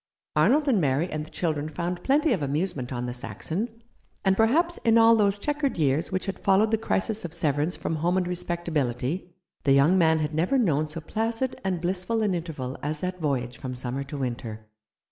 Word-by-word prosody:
Arnold 295 +3 +4
and 230 -9 +3
Mary 145 +3 +1
and 155 0 -3
the 155 - -11
children 155 -4 -2
found 175 +3 -4
plenty 295 +1 +3
of 190 - -1
amusement 145 -2 -2
on 120 -1 -3
the 125 - -3
Saxon; 220 - -5 0.4
and 190 0 +4
perhaps 315 - +2
in 230 -1 +4
all 230 0 +7
those 205 -2 +2
chequered 290 +3 -1
years 145 0 +1
which 185 0 -1
had 195 - -4
followed 200 +3 +3
the 225 - +3
crisis 220 0 0
of 175 -1 -6
severance 150 0 0
from 160 - -3
home 175 +4 +1
and 180 -1 0
respectability 170 -3 -2 0.3
the 140 - +4
young 150 +7 +5
man 160 -1 +4
had 155 0 -2
never 175 - +2
known 155 - +2
so 155 +2 -7
placid 225 +8 -2
and 185 -3 -1
blissful 185 +5 0
an 205 -3 +1
interval 155 -7 -4
as 150 +1 -3
that 180 -1 -3
voyage 125 -5 -1
from 130 -1 -5
summer 125 +2 -3
to 145 +1 -7
winter. 120 -4 -4
170 Hz, 200 wpm, -26 LUFS, 145-205 Hz, 0.4 s, all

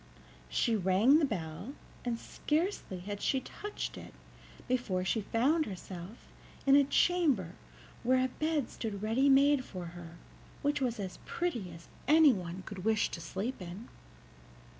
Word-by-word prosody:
She 225 - +2
rang 205 - +5
the 310 - +3
bell, 195 - -5 0.3
and 240 -2 -1
scarcely 300 - -2
had 205 +2 -5
she 265 - +2
touched 415 +10 -6
it - - -12 0.5
before 210 -8 0
she 220 +4 +1
found 280 +10 +2
herself 185 +2 -8 0.4
in 275 0 +7
a 285 - +7
chamber 280 - +2 0.5
where 255 +1 +3
a - - +1
bed 305 -1 -1
stood 210 -3 -5
ready 245 +6 +3
made 280 0 +5
for 185 -7 -7
her, 170 -1 -10 0.5
which 290 0 +1
was 240 -4 0
as 190 -2 -5
pretty 240 - -2
as 165 0 -12 0.2
anyone 205 - +4
could 195 -4 -7
wish 220 0 +2
to 170 - -5
sleep 195 +8 -4
in. 180 +6 -8
230 Hz, 145 wpm, -32 LUFS, 185-280 Hz, 0.5 s, in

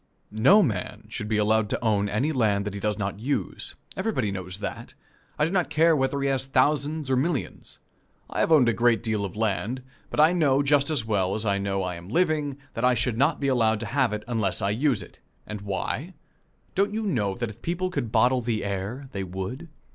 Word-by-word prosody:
No 135 - +6
man 105 - -3
should 110 -2 -5
be 110 0 0
allowed 105 0 +2
to - - -2
own 105 -2 +2
any 125 +10 0
land 105 -7 +1
that 105 - -3
he 100 - -5
does 105 0 -1
not 100 -1 -3
use. 120 - -3 0.2
Everybody 130 - -1
knows 90 -1 -5
that 105 - -6 0.4
I 150 - +3
do 165 - -2
not 185 -3 +1
care 165 +1 +4
whether 135 0 0
he 140 - +1
has 135 -1 0
thousands 145 +2 +1
or - - +4
millions. 140 +1 -2 0.5
I - - -4
have - - +2
owned 145 -6 +6
a 115 - +3
great 115 +2 +2
deal 110 -3 0
of 95 -3 -5
land, 110 +4 -1 0.3
but - - -4
I 155 +3 +6
know 145 -5 +3
just 140 0 +3
as 145 -8 0
well 100 -3 0
as 110 +1 -3
I 100 -1 +1
know 100 -1 -1
I 90 -1 -3
am 85 +2 -11
living 150 - +1 0.2
that 115 - -4
I 125 0 +4
should 125 0 0
not 140 +2 +3
be 140 - -1
allowed 115 -5 +2
to - - -3
have 135 -5 +2
it 105 0 -3
unless 110 -5 0
I 100 -1 0
use 130 +2 +1
it. - - -16 0.3
And 105 -1 -6
why? 120 - -3 0.6
Don't 200 +2 +1
you 220 - -1
know 105 - 0
that 120 -2 -3
if 110 +2 -17
people 180 +2 -2
could 130 -9 -3
bottle 125 +3 +3
the 115 -2 -1
air, 100 +8 -4
they 95 - -3
would? 95 - -6
120 Hz, 225 wpm, -26 LUFS, 105-140 Hz, 0.6 s, No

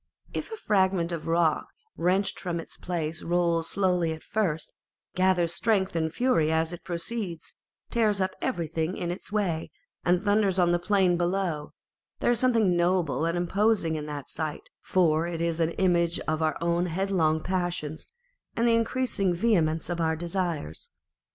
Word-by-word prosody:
If - - -4
a 445 - -6
fragment 190 - +1
of 165 -2 -4
a - - -2
rock 165 -2 +2 0.3
wrenched 190 +3 +1
from 175 -2 -3
its - - -6
place 165 -2 -3
rolls 170 -1 +1
slowly 180 -4 +1
at 160 - -10
first, 185 -7 -1 0.4
gathers 180 -2 +2
strength 195 -2 +1
and 160 -1 0
fury 165 -9 +2
as 160 +1 +1
it 175 - -8
proceeds, 175 0 -4 0.4
tears 215 -4 +2
up 190 0 +1
everything 165 - -2
in 175 -1 -2
its 180 - -7
way, 185 -7 -1 0.3
and 180 +1 +2
thunders 205 -2 +2
on 175 -2 +4
the 175 - +2
plain 185 -2 +2
below, 175 -4 -1 0.5
there - - +2
is 240 - +2
something 225 -8 +3
noble 175 -3 +1
and 170 +1 0
imposing 190 -1 +1
in 150 -1 -4
the 145 -2 -5
sight, 155 -2 -5
for 165 -3 +2
it 170 -1 -4
is 170 0 -1
an 165 -1 +2
image 170 -2 +2
of 155 0 -2
our 155 -2 +1
own 170 +1 +1
headlong 170 -3 +1
passions 175 -4 -3 0.5
and 235 +1 +3
the 230 - +4
increasing 230 -5 +1
vehemence 170 -6 +1
of 175 -1 -2
our 160 0 +1
desires. 170 - -3
175 Hz, 165 wpm, -27 LUFS, 165-195 Hz, 0.5 s, on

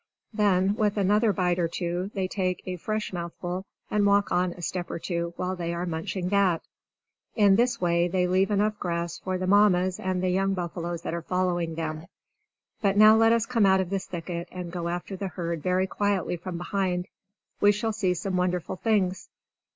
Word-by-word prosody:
Then, 200 -2 +3
with 210 -1 +1
another 210 +3 +3
bite 180 -1 0
or 170 - +2
two, 175 +2 -3
they 190 -1 0
take 185 -2 -2
a 185 -1 -4
fresh 215 +3 -3
mouthful 175 +2 -5 0.2
and 210 -1 +2
walk 200 0 +3
on 180 0 +2
a 175 - -11
step 175 +1 -3
or - - -3
two 170 0 -3
while 185 +1 -2
they 170 -1 -3
are 175 +1 -2
munching 175 +2 -3
that. 195 -4 +2 0.7
In 205 -3 +5
this 245 +3 +2
way 170 -1 +2
they 180 0 +1
leave 185 +2 +2
enough 210 +1 +1
grass 170 -1 -3
for 185 -1 -2
the 185 - -2
Mammas 185 -2 +4
and 185 -1 -1
the 185 - +2
young 195 +1 +1
buffaloes 170 -1 -4
that - - -3
are 170 - -2
following 175 -2 -1
them. 160 0 -4 0.7
But 200 -2 +2
now 215 +1 +8
let 225 0 +5
us 230 -1 +3
come 230 -5 +2
out 190 0 +5
of 185 -1 -2
this 195 -1 -2
thicket, 170 0 -5
and 180 -2 -6
go 170 -1 -3
after 175 +3 -4
the 195 +1 -4
herd 170 -3 -4
very 185 +2 +1
quietly 200 -2 -1
from 175 0 -6
behind. 180 0 -1 0.5
We 205 - +6
shall 215 +2 -1
see 190 -4 0
some 185 +2 -2
wonderful 180 0 -1
things. 190 -3 0
185 Hz, 195 wpm, -26 LUFS, 175-200 Hz, 0.7 s, now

